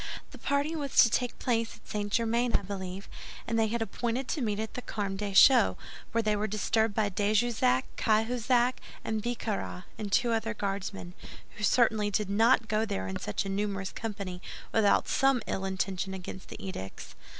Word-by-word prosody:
The - - -12
party 285 +3 0
was 285 -4 -4
to 230 - +2
take 245 -1 0
place 230 -2 0
at - - -21
St. 205 -1 -3
Germain, 235 +2 +1
I - - +2
believe, 190 0 -6 0.4
and 230 0 0
they 220 - +3
had 230 +1 -1
appointed 240 +4 -2
to 300 - -1
meet 210 -3 -1
at 220 0 -4
the 250 - -5
Carmes 200 -5 -3
Deschaux, 210 +6 +6 0.3
when 230 -1 +1
they 215 -1 +2
were 210 +1 -1
disturbed 215 +1 +1
by 215 -2 +2
de 205 +2 0
Jussac, 210 - +3
Cahusac, 240 +3 +2 0.3
Bicarat, 220 -4 -3 0.2
and 205 -2 -4
two 240 +3 +3
other 225 0 -1
Guardsmen, 195 -3 -4 0.4
who 210 - -7
certainly 220 -2 +3
did 205 -1 -1
not 225 +2 +4
go 215 0 +1
there 95 - -2
in 95 - -4
such 105 - -2
a - - -3
numerous 195 -1 -2
company 200 -5 -5 0.3
without 215 -3 +3
some 270 -1 +3
ill 190 - -2
intention 190 0 -2
against 185 0 -8
the - - -8
edicts." 95 - -7
215 Hz, 180 wpm, -29 LUFS, 195-230 Hz, 0.4 s, Deschaux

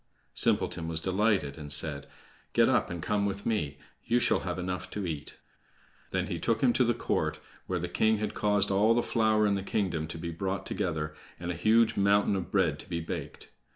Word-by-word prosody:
Simpleton 80 -1 +2
was 80 -1 -2
delighted, 95 -5 +1
and 75 -1 -4
said: 75 -1 0 0.5
"Get - - +5
up - - +2
and 85 -2 -5
come 105 -1 +1
with 100 0 -4
me. 75 -12 -1 0.3
You 120 - +2
shall 120 - +3
have 90 -1 -4
enough 90 0 -4
to 105 -2 -4
eat." 75 -3 -5 0.7
Then - - -1
he - - -4
took - - 0
him - - +4
to - - +3
the - - +1
court, - - -1 0.3
where 90 - -1
the 90 +1 -2
king 110 +5 +2
had 105 0 -3
caused 105 -1 +2
all 105 +4 +4
the 120 - +2
flour 110 -2 +2
in 100 - +2
the 100 - -1
kingdom 95 -6 -1
to 80 - -7
be 85 +1 -4
brought 95 +3 -3
together, 75 -3 -2 0.3
and 85 +1 -3
a - - -2
huge 110 +6 +3
mountain 100 0 +3
of 90 -4 -3
bread - - +1
to - - -11
be 85 -2 -2
baked. 80 - -6
95 Hz, 210 wpm, -29 LUFS, 80-105 Hz, 0.7 s, Get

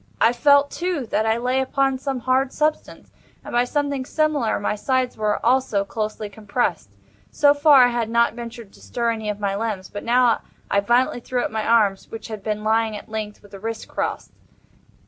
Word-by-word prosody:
I 230 - +4
felt, 285 +3 +4
too, 345 -6 -2
that 220 - +1
I 220 +1 +2
lay 250 +2 0
upon 270 0 0
some 270 -2 -3
hard 260 +2 +1
substance; 305 0 -2 0.3
and - - -7
by 240 +1 +3
something 285 0 -1
similar 295 -4 0
my 205 - -1
sides 255 +4 -1
were, 210 -1 0
also, 240 -5 +2
closely 215 0 -4
compressed. 210 +3 -2 0.4
So 285 -1 +4
far, 285 -2 +6
I 245 - +4
had 235 -2 -2
not 235 0 +2
ventured 235 -3 -9
to - - -18
stir 235 -1 -1
any 220 -2 -4
of 210 0 -3
my 200 -1 -1
limbs—but 205 -2 -4
now 240 0 +3 0.3
I 200 - +4
violently 240 +5 +2
threw 245 +1 -2
up - - -3
my 220 -1 -2
arms, 210 -4 +2
which 225 -1 -8
had 215 -2 -6
been 210 +1 -3
lying 220 0 +1
at - - -12
length, 215 -1 -5
with 205 - -17
the 195 - -10
wrists 225 +2 -5
crossed. - - -4
235 Hz, 195 wpm, -22 LUFS, 215-260 Hz, 0.4 s, far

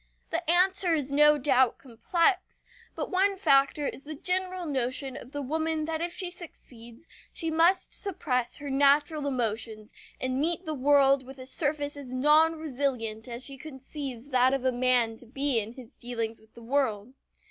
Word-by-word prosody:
The 335 0 -2
answer 365 0 +3
is 285 -3 -2
no 300 +1 +5
doubt 260 -3 +2
complex, 335 - -1 0.3
but - - -4
one 390 +1 +2
factor 275 -3 +3
is 270 - -4
the 310 +1 -7
general 365 +2 -1
notion 265 -2 -2
of 255 - -10
the 290 -1 -4
woman 315 +2 -1
that 320 0 -3
if 345 0 -2
she 360 0 -2
succeeds 245 -6 -12 0.3
she 325 -2 -2
must 340 +4 +3
suppress 255 - -2
her 285 -1 -6
natural 285 +2 +3
emotions 225 -4 -3 0.3
and 260 +1 -1
meet 340 +3 -1
the 315 - -3
world 275 -1 +4
with 265 +1 -12
a 255 - -9
surface 290 +1 -1
as 260 -3 -8
non 305 +5 +4
resilient 255 -7 -3
as 240 +1 -7
she 275 -1 -8
conceives 270 -2 -7
that 255 0 +3
of 270 - -4
man 245 -2 +2
to 245 - -14
be 270 0 0
in 220 +2 -6
his 250 0 -13
dealings 230 -2 -4
with 220 0 -25
the 235 - -12
world. 245 -3 -1
280 Hz, 170 wpm, -28 LUFS, 250-315 Hz, 0.3 s, no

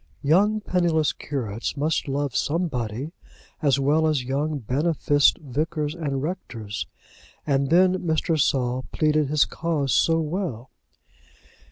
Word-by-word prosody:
Young 205 +9 +3
penniless 170 -6 +1
curates 120 -2 -4
must 150 +2 0
love 140 -1 -2
somebody 140 -5 -2 0.5
as 140 -3 +3
well 150 +4 +2
as 150 -5 +1
young 145 +4 -1
beneficed 145 +3 +2
vicars 150 +2 -2
and 140 -5 -3
rectors. 115 - -5 0.6
And 140 -2 +1
then 185 +3 +4
Mr. 160 -1 0
Saul 130 -1 0
pleaded 155 -1 +2
his 150 +1 +3
cause 155 -6 -1
so 165 +10 +3
well! 155 - -3
150 Hz, 120 wpm, -24 LUFS, 135-165 Hz, 0.6 s, then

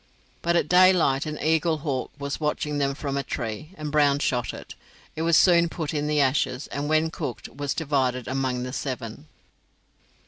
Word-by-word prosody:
But 170 0 +1
at 170 - +2
daylight 180 -6 +4
an 155 0 -4
eaglehawk 155 -3 0
was 140 -1 -4
watching 150 -1 -1
them 140 -1 0
from 140 -1 -4
a - - +1
tree, 115 +3 -5
and 150 -1 -5
Brown 145 -2 +4
shot 125 -4 -1
it. - - -10 0.4
It 160 - -4
was 165 0 +4
soon 170 -2 +5
put 160 -3 -4
in 150 -1 -1
the 150 0 +1
ashes, 130 -1 +1
and 145 +1 -3
when 155 +1 +2
cooked 145 -8 -5
was 140 +3 -4
divided 130 -6 0
among 130 -2 -1
the 125 0 -5
seven. 130 0 -5
145 Hz, 175 wpm, -25 LUFS, 135-155 Hz, 0.4 s, soon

